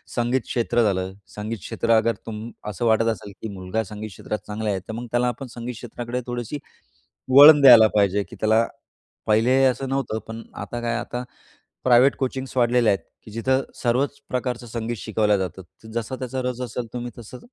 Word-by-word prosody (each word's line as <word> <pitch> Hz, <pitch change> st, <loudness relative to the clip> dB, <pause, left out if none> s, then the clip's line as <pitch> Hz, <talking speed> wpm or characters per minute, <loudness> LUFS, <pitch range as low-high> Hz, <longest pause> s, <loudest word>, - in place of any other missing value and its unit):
संगीत 120 Hz, +1 st, +1 dB
क्षेत्र 120 Hz, 0 st, 0 dB
झालं. 95 Hz, -2 st, 0 dB, 0.2 s
संगीत 105 Hz, +2 st, -4 dB
क्षेत्र 115 Hz, -, -2 dB
अगर 115 Hz, 0 st, +2 dB
तुम 110 Hz, -1 st, -6 dB, 0.3 s
असं 110 Hz, +4 st, -3 dB
वाटत 115 Hz, 0 st, +3 dB
असेल, 105 Hz, -2 st, -7 dB
की 110 Hz, -, -4 dB
मुलगा 95 Hz, +4 st, -2 dB
संगीत 105 Hz, +2 st, -7 dB
क्षेत्रात 105 Hz, +3 st, -5 dB
चांगला 105 Hz, +1 st, -3 dB
आहे, 95 Hz, -2 st, 0 dB
तर 110 Hz, +4 st, -9 dB
मग 120 Hz, +2 st, -5 dB
त्याला 120 Hz, +1 st, +2 dB
आपण 125 Hz, +2 st, -4 dB
संगीत 120 Hz, +1 st, -6 dB
क्षेत्राकडे 120 Hz, +2 st, -5 dB
थोडीशी 120 Hz, +3 st, -4 dB, 0.8 s
वळण 145 Hz, 0 st, +10 dB
द्यायला 120 Hz, -5 st, +9 dB
पाहिजे. 100 Hz, 0 st, +3 dB
की -, -, -13 dB
त्याला 110 Hz, +1 st, +3 dB, 0.6 s
पहिले 120 Hz, +5 st, +4 dB
असं 130 Hz, +1 st, 0 dB
नव्हतं, 135 Hz, -5 st, -1 dB
पण 115 Hz, +1 st, -7 dB
आता 120 Hz, 0 st, -6 dB
काय, 120 Hz, 0 st, -1 dB
आता 120 Hz, +1 st, -5 dB, 0.6 s
प्रायव्हेट 130 Hz, +2 st, +5 dB
कोचिंग्स 130 Hz, 0 st, -3 dB
वाढलेल्या 120 Hz, -3 st, +4 dB
आहेत, 95 Hz, -, -5 dB, 0.2 s
की 110 Hz, -, -12 dB
जिथं 130 Hz, +4 st, +1 dB, 0.2 s
सर्वच 135 Hz, +4 st, +1 dB
प्रकारचं 125 Hz, -1 st, -3 dB
संगीत 115 Hz, 0 st, -4 dB
शिकवलं 105 Hz, 0 st, +1 dB
जातं. 95 Hz, 0 st, -4 dB, 0.2 s
तर 110 Hz, -, -11 dB
जसा 125 Hz, +3 st, -5 dB
त्याचा 130 Hz, 0 st, -4 dB
रस 125 Hz, 0 st, -6 dB
असेल, 120 Hz, 0 st, -4 dB
तुम्ही 120 Hz, 0 st, -4 dB
तसं 120 Hz, +2 st, -10 dB
120 Hz, 180 wpm, -23 LUFS, 110-125 Hz, 0.8 s, वळण